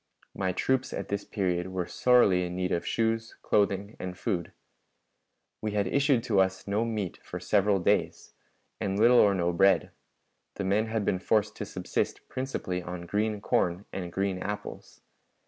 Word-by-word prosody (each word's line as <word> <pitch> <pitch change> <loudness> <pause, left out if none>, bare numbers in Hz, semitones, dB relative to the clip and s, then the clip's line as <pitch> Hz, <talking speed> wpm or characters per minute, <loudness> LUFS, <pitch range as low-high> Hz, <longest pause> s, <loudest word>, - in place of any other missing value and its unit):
My 95 -1 -1
troops 130 +7 0
at - - -5
this 100 0 -2
period 90 -3 -1
were 95 -1 -3
sorely 100 -5 +4
in 90 0 -4
need 90 0 -1
of 85 - -1
shoes, 115 0 0
clothing, 100 +1 +1
and 90 -1 -5
food. 95 -8 -2 1.1
We 105 -1 -2
had 100 -1 +1
had 90 - -4
issued 140 -4 +3
to 110 -6 +2
us 95 +1 -1
no 105 +3 +1
meat 105 -5 -3
for - - -6
several 100 -1 +2
days, 90 - 0 0.5
and 95 0 -1
little 120 +3 +6
or 100 -2 +5
no 85 -1 0
bread; 95 +3 +3 0.6
the - - -3
men 100 +4 +1
had 110 -2 -1
been 95 - +1
forced 105 +2 +1
to - - -4
subsist - - -3
principally 130 -9 -3
on 85 0 -6
green 105 +3 -1
corn 90 0 0
and 90 -2 -4
green 95 0 -1
apples. 105 +2 -6
100 Hz, 170 wpm, -28 LUFS, 90-110 Hz, 1.1 s, little